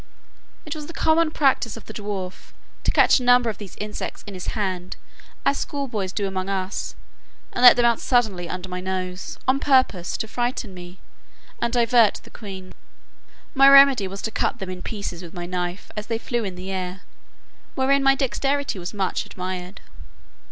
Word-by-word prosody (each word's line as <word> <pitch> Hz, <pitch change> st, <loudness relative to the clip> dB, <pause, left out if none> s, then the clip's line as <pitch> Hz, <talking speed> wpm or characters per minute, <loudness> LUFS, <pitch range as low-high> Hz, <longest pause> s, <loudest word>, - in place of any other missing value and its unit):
It 305 Hz, -, -4 dB
was 300 Hz, -1 st, -7 dB
the 335 Hz, -, -9 dB
common 320 Hz, 0 st, +3 dB
practice 270 Hz, -7 st, +1 dB
of 225 Hz, -, -11 dB
the 220 Hz, -, -9 dB
dwarf, 200 Hz, -3 st, -6 dB, 0.3 s
to -, -, +3 dB
catch -, -, +5 dB
a -, -, -5 dB
number 245 Hz, -1 st, +5 dB
of 205 Hz, -, -13 dB
these 205 Hz, -3 st, -9 dB
insects 210 Hz, 0 st, -6 dB
in 205 Hz, -, -8 dB
his 180 Hz, -1 st, -7 dB
hand, 185 Hz, -3 st, -2 dB, 0.5 s
as 280 Hz, -, +2 dB
schoolboys 235 Hz, -10 st, -3 dB
do 200 Hz, +1 st, -2 dB
among 190 Hz, 0 st, -3 dB
us, 190 Hz, 0 st, -3 dB, 0.6 s
and -, -, -2 dB
let 245 Hz, -1 st, +10 dB
them 245 Hz, -, +3 dB
out 235 Hz, -1 st, +3 dB
suddenly 210 Hz, -9 st, +1 dB
under 185 Hz, +2 st, -5 dB
my 180 Hz, 0 st, -5 dB
nose, 185 Hz, 0 st, -4 dB
on 265 Hz, +1 st, +3 dB
purpose 255 Hz, -12 st, +2 dB
to 220 Hz, -, -3 dB
frighten 240 Hz, -3 st, -2 dB
me, 180 Hz, 0 st, -10 dB, 0.6 s
and 235 Hz, -, 0 dB
divert 235 Hz, -2 st, +4 dB
the -, -, -16 dB
queen. 190 Hz, -4 st, -9 dB, 0.8 s
My 275 Hz, 0 st, +7 dB
remedy 275 Hz, -7 st, +7 dB
was 195 Hz, +1 st, -7 dB
to 220 Hz, -, -2 dB
cut -, -, -1 dB
them 190 Hz, -1 st, -5 dB
in 180 Hz, -1 st, -7 dB
pieces 200 Hz, -5 st, -5 dB
with 175 Hz, 0 st, -11 dB
my 175 Hz, 0 st, -5 dB
knife, 180 Hz, +1 st, -4 dB
as 210 Hz, 0 st, -5 dB
they 230 Hz, -, -1 dB
flew 235 Hz, 0 st, -2 dB
in 190 Hz, -3 st, -4 dB
the 185 Hz, +2 st, -6 dB
air, 185 Hz, 0 st, -4 dB, 0.7 s
wherein 275 Hz, +1 st, +3 dB
my 270 Hz, 0 st, +5 dB
dexterity 275 Hz, -2 st, -1 dB
was 175 Hz, +4 st, -6 dB
much 190 Hz, -2 st, -1 dB
admired. 185 Hz, 0 st, -6 dB
205 Hz, 185 wpm, -23 LUFS, 185-250 Hz, 0.8 s, let